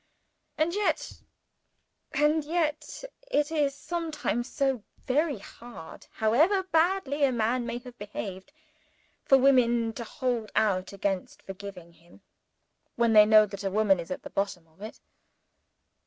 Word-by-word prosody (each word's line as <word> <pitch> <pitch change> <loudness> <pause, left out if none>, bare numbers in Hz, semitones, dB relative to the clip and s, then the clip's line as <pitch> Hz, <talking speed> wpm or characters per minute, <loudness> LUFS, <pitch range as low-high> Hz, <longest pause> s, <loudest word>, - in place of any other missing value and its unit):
And 320 +2 +1
yet 415 +1 -1 0.9
and 300 +2 +2
yet 310 +5 -2 0.3
it 295 -10 +1
is 290 -3 +1
sometimes 305 -6 -3
so 270 -5 0 0.2
very 290 +1 +1
hard, 230 -3 -12
however 315 - +3
badly 330 -4 +1
a 275 - +4
man 240 +1 0
may 240 - -3
have 245 0 -11
behaved, 200 +1 -7 0.7
for 270 - +6
women 240 -4 +3
to 235 - -6
hold 235 -2 -3
out 190 -4 +1
against 195 -1 -3
forgiving 190 -3 -9
him, 170 +4 -21 0.7
when 235 -1 +2
they 210 -1 +8
know 215 0 +7
that 200 -1 -8
a 195 - 0
woman 200 -2 +3
is 165 - -7
at 185 - -5
the - - -9
bottom 195 -4 -2
of 160 +3 -26
it. 215 - -8
240 Hz, 140 wpm, -28 LUFS, 200-295 Hz, 0.9 s, they